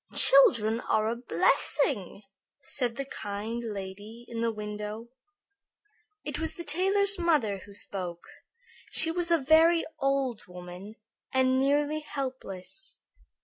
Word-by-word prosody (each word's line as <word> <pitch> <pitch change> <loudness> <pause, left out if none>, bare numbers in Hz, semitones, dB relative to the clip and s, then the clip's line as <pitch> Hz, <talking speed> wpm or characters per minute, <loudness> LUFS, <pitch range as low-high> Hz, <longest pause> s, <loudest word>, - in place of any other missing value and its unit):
"Children 235 - +5
are 215 0 +1
a 230 - -1
blessing," 215 - 0 0.4
said 245 -4 -1
the 275 - -4
kind 220 0 -5
lady 205 +2 -7
in 230 -1 -5
the 230 0 +1
window. 210 +1 -6 1.1
It 295 -1 -4
was 320 0 +1
the 340 - -6
tailor's 390 +5 +3
mother 290 - +1
who 200 +1 -14
spoke. 180 -4 -4 0.6
She 325 - +1
was 350 0 -1
a 335 - +5
very 320 +4 +4
old 270 -6 -1
woman 180 +3 -10 0.4
and 260 0 +3
nearly 290 +3 +1
helpless. 270 - -6
240 Hz, 120 wpm, -28 LUFS, 210-310 Hz, 1.1 s, Children